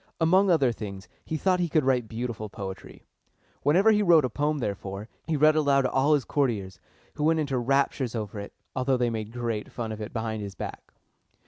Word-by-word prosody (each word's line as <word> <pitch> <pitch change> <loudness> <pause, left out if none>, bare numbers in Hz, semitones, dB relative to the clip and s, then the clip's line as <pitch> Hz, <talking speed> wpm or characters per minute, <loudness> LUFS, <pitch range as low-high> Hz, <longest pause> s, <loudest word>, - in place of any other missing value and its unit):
Among 185 +4 +4
other 140 -8 +4
things, 100 -4 -7 0.2
he 160 - -3
thought 185 +3 +2
he 175 -1 0
could 155 -1 +2
write 125 -3 +2
beautiful 115 -1 -4
poetry. 95 -2 -8 0.6
Whenever 190 +9 +4
he 210 -1 +3
wrote 170 -7 +5
a 125 - -3
poem, 150 +4 0
therefore, 100 -3 -4 0.2
he 160 -2 0
read 155 +2 +5
it - - +4
aloud 140 -2 +3
to 130 - 0
all 140 +3 +4
his 140 - -1
courtiers, 110 -10 -1 0.3
who 150 - -4
went 160 +1 +3
into 140 -4 0
raptures 135 -1 0
over 105 -2 -4
it, 100 - -7 0.2
although 130 0 +1
they 120 -1 +1
made 110 -1 -4
great 115 -3 -3
fun 115 -2 -4
of 110 0 -6
it 105 - -5
behind 110 -1 -3
his 100 -1 -6
back. - - -7
125 Hz, 210 wpm, -27 LUFS, 110-150 Hz, 0.6 s, wrote